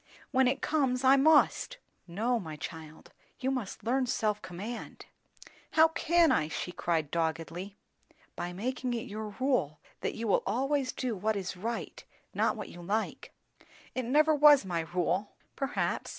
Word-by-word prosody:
"When 260 Hz, 0 st, +4 dB
it 255 Hz, -, -1 dB
comes, 270 Hz, -4 st, +1 dB
I 265 Hz, +1 st, +7 dB
must." 315 Hz, -, +4 dB, 0.3 s
"No, 225 Hz, +8 st, 0 dB
my 160 Hz, -6 st, -7 dB
child; 160 Hz, 0 st, -9 dB, 0.3 s
you 260 Hz, +1 st, 0 dB
must 250 Hz, -7 st, -4 dB
learn 255 Hz, +2 st, +1 dB
self 215 Hz, -4 st, 0 dB
command." 205 Hz, +7 st, -7 dB, 0.7 s
"How 320 Hz, 0 st, +6 dB
can 335 Hz, +1 st, +3 dB
I?" 150 Hz, -, +2 dB
she 175 Hz, +3 st, -4 dB
said 160 Hz, -4 st, +1 dB
doggedly. 165 Hz, +4 st, -3 dB, 0.6 s
"By 175 Hz, -, -4 dB
making 245 Hz, +6 st, -3 dB
it 230 Hz, -, -2 dB
your 210 Hz, 0 st, -6 dB
rule, 250 Hz, -, +1 dB, 0.2 s
that -, -, -3 dB
you 230 Hz, 0 st, -3 dB
will 200 Hz, -, +3 dB
always 270 Hz, +1 st, 0 dB
do 250 Hz, -4 st, -3 dB
what 215 Hz, +3 st, 0 dB
is 190 Hz, -3 st, -4 dB
right 225 Hz, +6 st, -5 dB, 0.3 s
not -, -, +1 dB
what -, -, -7 dB
you 175 Hz, -, -11 dB
like." 210 Hz, +5 st, -3 dB, 0.6 s
"It 255 Hz, -1 st, -2 dB
never 305 Hz, +5 st, +4 dB
was 295 Hz, -5 st, +7 dB
my 175 Hz, -3 st, -1 dB
rule." 180 Hz, +3 st, 0 dB, 0.2 s
"Perhaps. 275 Hz, 0 st, -2 dB
225 Hz, 155 wpm, -30 LUFS, 180-265 Hz, 0.7 s, I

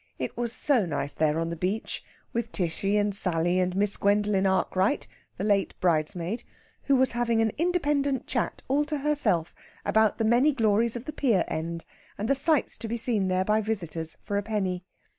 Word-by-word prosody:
It -, -, -4 dB
was 240 Hz, -1 st, -2 dB
so 245 Hz, -5 st, +3 dB
nice 145 Hz, -2 st, -2 dB
there 155 Hz, 0 st, +1 dB
on 165 Hz, 0 st, -1 dB
the -, -, -3 dB
beach, 185 Hz, +6 st, -2 dB, 0.3 s
with 235 Hz, 0 st, -2 dB
Tishy 195 Hz, +3 st, 0 dB
and 205 Hz, -1 st, +1 dB
Sally 175 Hz, -2 st, 0 dB
and 180 Hz, 0 st, 0 dB
Miss 200 Hz, +1 st, +2 dB
Gwendolen 200 Hz, -1 st, +2 dB
Arkwright, 190 Hz, +5 st, +1 dB, 0.3 s
the -, -, -3 dB
late 200 Hz, -2 st, +1 dB
bridesmaid, 170 Hz, +4 st, 0 dB, 0.4 s
who 280 Hz, -, +4 dB
was 260 Hz, 0 st, +4 dB
having 235 Hz, -1 st, +1 dB
an 225 Hz, -1 st, +2 dB
independent 295 Hz, -6 st, +1 dB
chat -, -, -2 dB
all 280 Hz, +3 st, +2 dB
to 300 Hz, 0 st, -2 dB
herself 270 Hz, -, 0 dB, 0.3 s
about 220 Hz, -1 st, +3 dB
the 225 Hz, -, 0 dB
many 245 Hz, +7 st, +4 dB
glories 225 Hz, -1 st, +2 dB
of 240 Hz, +1 st, -6 dB
the 305 Hz, -, -5 dB
pier 240 Hz, -10 st, +2 dB
end, 165 Hz, +1 st, -4 dB, 0.3 s
and 210 Hz, -, -2 dB
the 275 Hz, -, +4 dB
sights 290 Hz, +1 st, +1 dB
to 230 Hz, -, -5 dB
be 235 Hz, +2 st, -2 dB
seen 220 Hz, -4 st, +2 dB
there 185 Hz, 0 st, +1 dB
by 215 Hz, +1 st, +2 dB
visitors 170 Hz, -7 st, -4 dB
for 200 Hz, -1 st, -2 dB
a -, -, +1 dB
penny. 195 Hz, -4 st, -2 dB
210 Hz, 190 wpm, -27 LUFS, 185-240 Hz, 0.4 s, who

